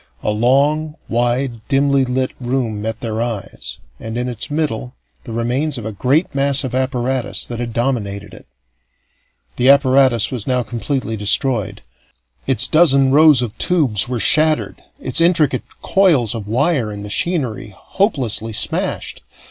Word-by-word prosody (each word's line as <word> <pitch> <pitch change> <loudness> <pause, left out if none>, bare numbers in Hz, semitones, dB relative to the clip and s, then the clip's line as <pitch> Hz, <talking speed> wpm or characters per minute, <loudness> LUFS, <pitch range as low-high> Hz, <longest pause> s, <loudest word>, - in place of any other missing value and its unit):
A - - 0
long, 140 +7 +1
wide, 120 0 -1
dimly 140 -1 +2
lit 130 +1 -1
room 120 -4 -2
met 110 +1 -4
their 110 -1 -3
eyes, 115 -4 -4 0.2
and 110 +1 -6
in 125 +1 -2
its 120 -3 -5
middle 140 -5 -3 0.3
the 115 - -8
remains 125 +6 -1
of 115 - -7
a 110 - -3
great 135 - 0
mass 140 0 +2
of 130 - -5
apparatus 130 -1 -1
that 120 -1 -6
had 120 -1 -4
dominated 110 -5 -2
it. - - -13 1.1
The 125 +2 +3
apparatus 130 -4 +4
was 125 -5 -5
now 125 -1 +1
completely 120 0 -3
destroyed. 105 +2 -1 0.6
Its 130 -1 +3
dozen 140 -5 +4
rows 150 -3 +6
of 115 -4 -5
tubes 140 - +2
were 125 -2 -2
shattered, 155 +8 +2 0.2
its 130 +5 0
intricate 160 -6 +2 0.2
coils 160 - +3
of 110 -3 -6
wire 130 0 0
and 100 -1 -7
machinery 120 - -2
hopelessly 125 - -1
smashed. - - -2
125 Hz, 145 wpm, -18 LUFS, 115-140 Hz, 1.1 s, rows